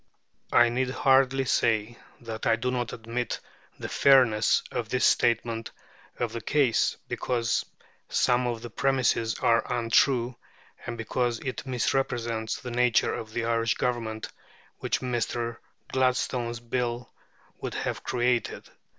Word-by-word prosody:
I 120 Hz, 0 st, +6 dB
need 125 Hz, +2 st, 0 dB
hardly 135 Hz, 0 st, +3 dB
say 115 Hz, -1 st, +1 dB, 0.2 s
that 115 Hz, -1 st, -5 dB
I -, -, +5 dB
do 125 Hz, +3 st, -2 dB
not 120 Hz, -2 st, -2 dB
admit 115 Hz, +2 st, -4 dB, 0.4 s
the -, -, -5 dB
fairness 125 Hz, -6 st, +4 dB
of 115 Hz, -3 st, -3 dB
this 130 Hz, +1 st, +2 dB
statement 115 Hz, -1 st, +2 dB, 0.5 s
of -, -, -2 dB
the 115 Hz, -, -4 dB
case, 135 Hz, -2 st, +2 dB
because 120 Hz, -2 st, -1 dB, 0.5 s
some 125 Hz, 0 st, +2 dB
of 115 Hz, -2 st, -3 dB
the 120 Hz, -, -7 dB
premises 130 Hz, -3 st, +1 dB
are 115 Hz, +1 st, +2 dB
untrue, 120 Hz, +1 st, +2 dB, 0.5 s
and 120 Hz, -1 st, -4 dB
because 120 Hz, +1 st, -1 dB
it 135 Hz, +1 st, -5 dB
misrepresents 120 Hz, -3 st, -1 dB
the 125 Hz, -, -7 dB
nature 120 Hz, -1 st, +2 dB
of 110 Hz, -1 st, -6 dB
the 115 Hz, +1 st, -2 dB
Irish 115 Hz, -1 st, +1 dB
Government 115 Hz, -3 st, -2 dB, 0.5 s
which -, -, -1 dB
Mr. 120 Hz, -1 st, -2 dB, 0.3 s
Gladstone's 125 Hz, -2 st, 0 dB
Bill 120 Hz, 0 st, -3 dB, 0.5 s
would -, -, -5 dB
have -, -, -3 dB
created. 120 Hz, -2 st, -1 dB
120 Hz, 130 wpm, -27 LUFS, 115-125 Hz, 0.5 s, I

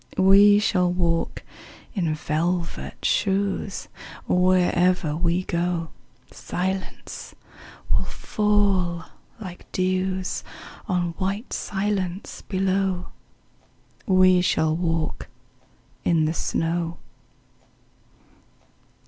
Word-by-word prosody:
We 200 Hz, +2 st, +7 dB
shall 180 Hz, -4 st, +2 dB
walk 170 Hz, -2 st, 0 dB, 0.5 s
in 170 Hz, -7 st, 0 dB
velvet 155 Hz, -, -2 dB
shoes: 195 Hz, 0 st, 0 dB, 0.4 s
Wherever 180 Hz, -3 st, +3 dB
we 170 Hz, +2 st, +1 dB
go 170 Hz, -2 st, -1 dB, 0.4 s
Silence 190 Hz, +1 st, -4 dB, 0.6 s
will -, -, +2 dB
fall 200 Hz, -5 st, +1 dB, 0.3 s
like 185 Hz, -5 st, -9 dB
dews 185 Hz, 0 st, -1 dB, 0.4 s
On 180 Hz, -4 st, 0 dB
white 200 Hz, +5 st, -2 dB
silence 195 Hz, -2 st, -2 dB
below. 190 Hz, -1 st, 0 dB, 1.0 s
We 185 Hz, -2 st, +5 dB
shall 160 Hz, -3 st, +2 dB
walk 165 Hz, -2 st, -2 dB, 0.8 s
in 165 Hz, -2 st, +3 dB
the 155 Hz, -, 0 dB
snow. 165 Hz, 0 st, -1 dB
180 Hz, 75 wpm, -24 LUFS, 170-190 Hz, 1.0 s, We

